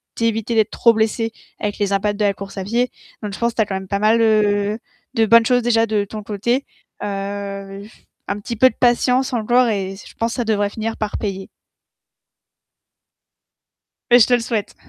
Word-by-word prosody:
t'éviter 230 0 -1
d'être 220 -1 +2
trop 235 - +4
blessé 225 +1 0 0.3
avec 205 -1 -2
les 200 -1 0
impacts 205 +1 0
de 210 - +2
la 200 - +2
course 195 0 -9
à 190 - -3
pied. 240 +4 0 0.3
Donc 210 - -3
je - - -7
pense 235 0 +1
que - - -33
tu 225 - +3
as - - -6
quand 195 - -4
même 190 0 -5
pas 200 0 -1
mal, 220 +2 +3
heu, 210 -1 +2 0.4
de 225 - +3
bonnes 230 +1 +6
choses 245 +1 +3
déjà 230 -1 +3
de 215 -2 0
ton 215 +1 -8
côté. 230 +6 -1 0.4
Heu 200 0 -5
j 215 - -17 0.2
un 200 - -3
petit 235 +3 -5
peu 260 +4 +6
de 225 - -13
patience 250 +2 +2
encore 240 +2 +3
et 195 -3 -2
c 195 - -13
je - - -17
pense 230 0 -1
que - - -5
ça 240 - 0
devrait 205 -2 +1
finir 225 +2 -4
par 215 -1 -3
payer. 195 -2 -4 2.6
Et 245 - +8
je 220 - +6
te 250 - +2
le 245 - +3
souhaite. 225 -3 -3
215 Hz, 215 wpm, -20 LUFS, 200-230 Hz, 2.6 s, Et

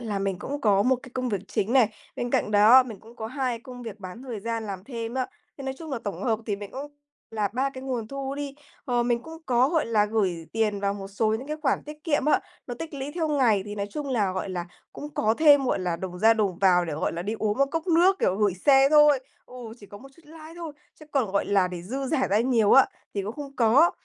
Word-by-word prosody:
là 215 -4 -3
mình 195 -2 -2
cũng 285 +1 -5
có 200 -2 +3
một 255 +2 +3
cái 255 - -12
công 255 -1 -1
việc 200 -4 -1
chính 210 +4 -1
này, 255 -5 +5 0.3
bên 245 0 -3
cạnh - - +1
đó 215 +5 +7
mình 225 -6 -9
cũng 230 +2 -16
có 220 - -5
2 255 -1 -2
công 250 0 -10
việc 220 -3 -8
bán 185 +5 -9
thời 240 -6 -6
gian 230 +1 -3
làm 195 -2 -6
thêm 230 -2 -5
á, 260 -1 0 0.3
thế 275 - -7
nói 265 0 -3
chung 320 -2 -8
là 265 - -2
tổng 200 - -4
hợp 225 -4 +1
thì 205 - -1
mình 200 0 -8
cũng 285 +2 -7 0.4
là 215 -2 -1
3 265 +3 0
cái 260 -1 -9
nguồn 245 -5 -3
thu 275 0 -4
đi. 280 -1 -5 0.3
Ờ, 245 -2 +1
mình 240 0 0
cũng 325 +2 -11
có, 250 +1 +3
gọi 320 -5 +1
là, 215 -2 +3
gửi 190 -7 -1
tiền 215 -2 0
vào 200 0 0
một 195 -1 -7
số 210 +2 0
những 250 +5 -5
cái 305 +1 -3
khoản 275 - +1
tiết 300 +1 -11
kiệm, 290 -5 +1
á, 300 - +3 0.3
nó 245 - -5
tích 325 -2 -6
lũy 275 +1 -5
theo 330 -3 -1
ngày 245 -9 +3
thì 205 0 -6
nói 200 -1 -3
chung 295 +1 -5
là, 210 -7 +1
gọi 185 +1 -3
là, 175 -2 -4 0.3
cũng 295 - -7
có 220 +1 +2
thêm, 290 -3 +6
gọi 255 - 0
là, 180 -2 -2
đồng 180 0 -6
ra 225 +3 +5
đồng 200 -5 -1
vào 180 -2 +4
để, 165 - -4
gọi 155 - -1
là, 170 +1 -4
đi 210 +4 -3
uống 215 +2 -1
một 275 - +4
cốc 325 +3 -3
nước, 360 +3 +4
kiểu, 185 - +1
gửi 205 -3 +2
xe 270 +7 +5
thôi 295 -2 +6 0.3
ừ, 250 - -15 0.3
chỉ 205 - -12
có 205 - -11
một 270 - -13
chút 335 - -20
lãi 315 +1 -12
thôi, 330 -3 -6 0.3
chứ 310 - -13
còn, 255 -9 0
gọi 200 - +1
là, 195 -2 +2
để 180 -1 -7
dư 265 +9 -4
dả 265 -1 +1
ra 205 +2 +3
nhiều, 230 -4 +3
á, 270 - +8 0.3
thì 200 - -1
cũng 210 - -4
không 275 +1 -9
có. 255 +9 +5
235 Hz, 275 wpm, -26 LUFS, 205-275 Hz, 0.4 s, á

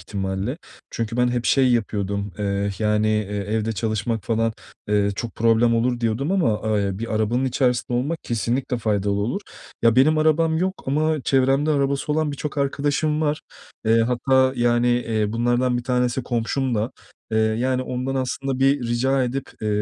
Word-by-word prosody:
ihtimalle. 95 - -3 0.3
Çünkü 115 0 -3
ben 125 0 +3
hep, 120 -1 -1
şey, 130 -2 +4
yapıyordum, 100 -3 -1
eh, 100 0 -2
yani, 105 0 +2
eee, 105 0 +2
evde 110 +2 -1
çalışmak 110 +1 -2
falan, 115 0 0 0.4
eee, 105 -1 +2
çok 120 - -5
problem 115 +1 +3
olur 120 +1 0
diyordum 120 +8 0
ama, 110 - +1
eee, - - +1
ya, 95 0 -3
bir 115 0 -3
arabanın 110 +4 +1
içerisinde 125 -2 0
olmak 155 +6 -2
kesinlikle 120 +2 -1
faydalı 105 -2 0
olur. 120 - -1 0.4
Ya, 115 0 +4
benim 155 +4 +5
arabam 160 +1 +2
yok 185 +2 -2
ama 155 +2 +1
çevremde 135 +3 +2
arabası 140 0 0
olan 155 -1 0
birçok 145 +1 -5
arkadaşım 145 +2 0
var. 150 -1 0 0.4
Eee, 115 +1 +4
hatta, 130 +2 +2
yani, 120 0 +2
eee, 115 -3 0
bunlardan 120 +2 +1
bir - - -4
tanesi 125 0 0
komşum 120 +2 -1
da. 110 +3 -1 0.4
Eee, 110 - +2
yani, 120 +4 +1
ondan 130 +1 -3
aslında 135 0 -2
bir 135 +1 +3
rica 130 +2 +1
edip, 130 +2 -3 0.2
eee, 105 - 0
120 Hz, 165 wpm, -22 LUFS, 110-135 Hz, 0.4 s, benim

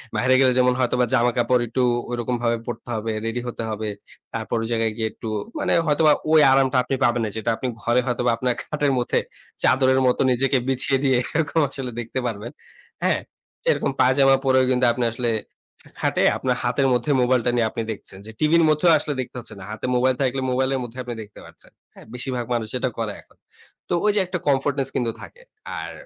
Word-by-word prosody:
বাইিরে 130 +1 +3
গেলে 130 -1 +5
যেমন 125 0 +4
হয়তোবা 125 0 +2
জামাকাপড় 120 +1 +2
একটু 125 +3 0 0.3
ঐরকমভাবে 120 -1 -1
পরতে 120 0 -6
হবে, 110 +1 -2
রেডি 115 +2 -2
হতে 115 -1 -4
হবে। 110 0 -3 0.4
তারপর - - -2
ওই - - -3
জায়গায় 115 -1 +1
গিয়ে 110 -1 0
একটু - - -8 0.3
মানে - - +1
হয়তোবা 150 +1 +4 0.2
ওই 160 - +7
আরামটা 135 -1 +3
আপনি 130 +2 -2
পাবেন 120 -1 +2
না, - - -2
যেটা 110 +1 -2
আপনি 130 - -4
ঘরে 120 +1 +2
হয়তোবা 125 -1 +1
আপনার 125 +1 0
খাটের 150 -2 0
মধ্যে 120 - +1 0.4
চাদরের 130 0 +4
মতো 125 - +2
নিজেকে 135 +2 +2
বিছিয়ে 135 +1 +1
দিয়ে 130 -2 +3 0.2
এরকম 160 +1 +1
আসলে 135 -2 -5
দেখতে 120 +2 -4
পারবেন। 115 +1 -5 0.5
হ্যাঁ, - - +2 0.4
যে - - +1
রকম - - -1
পায়জামা 135 +1 +5
পরেও 130 -1 +4
কিন্তু 125 0 +2
আপনি 120 0 -1
আসলে 120 -1 -1 0.7
খাটে - - +1
আপনার 125 -1 -1
হাতের 125 +3 +1
মধ্যে 125 +4 0
মোবাইলটা 125 -1 +2
নিয়ে 115 -2 +2
আপনি 115 - -3
দেখছেন। 95 -2 -7
যে 110 - -9
টিভির 165 +2 +4
মধ্যেও 155 +3 +4
আসলে 150 0 -3
দেখতে 130 0 -9
হচ্ছে 115 - -10
না, 95 - -9
হাতে 110 - -5
মোবাইল 130 +1 +2
থাকলে 135 0 0
মোবাইলের 130 +1 +1
মধ্যে 120 +1 -9
আপনি 120 -1 -5
দেখতে 105 -1 -15
পাচ্ছেন। - - -14 0.2
হ্যাঁ, - - -15
বেশিরভাগ 125 -1 -4
মানুষ 115 -2 -1
এটা 130 +1 -1
করে 110 -3 -2
এখন। - - -28 0.5
তো - - 0
ওই 210 - +5
যে - - +3
একটা 180 0 -3
comfortness 135 0 +1
কিন্তু 120 -3 0
থাকে। - - -12 0.4
আর - - -6
125 Hz, 195 wpm, -23 LUFS, 120-135 Hz, 0.7 s, ওই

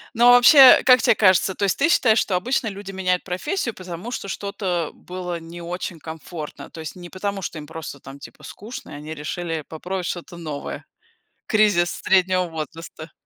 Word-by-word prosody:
Но 240 +1 +6
вообще, 255 +2 +9
как 255 -1 +7
те - - +4
кажется, 190 -2 +3
то - - -13
есть 195 - 0
ты 285 - +3
считаешь, 230 -10 +4
что 190 - +1
обычно 240 +4 0
люди 195 0 -8
меняют 185 -1 -1
профессию, 235 - -3
потому 180 +4 -7
что 200 - -5
что-то 190 -5 -3
было 180 -1 -6
не 170 +1 -10
очень 175 -1 -5
комфортно? 160 0 -8
То 165 - -11
есть 160 - -7
не 175 -1 -10
потому, 195 0 -4
что 160 - -5
им 150 - -10
просто 160 -3 -8
там, 135 +2 -11
типа, 140 - -13
скучно, 225 +4 -9
и - - -8
они 150 +2 -7
решили 160 +1 -4
попробовать 180 +3 -5
что-то 175 0 -6
новое? 155 -4 -6 0.6
Кризис 205 -6 +3
среднего 185 -1 +2
возраста. 160 0 -8
180 Hz, 180 wpm, -22 LUFS, 165-205 Hz, 0.6 s, вообще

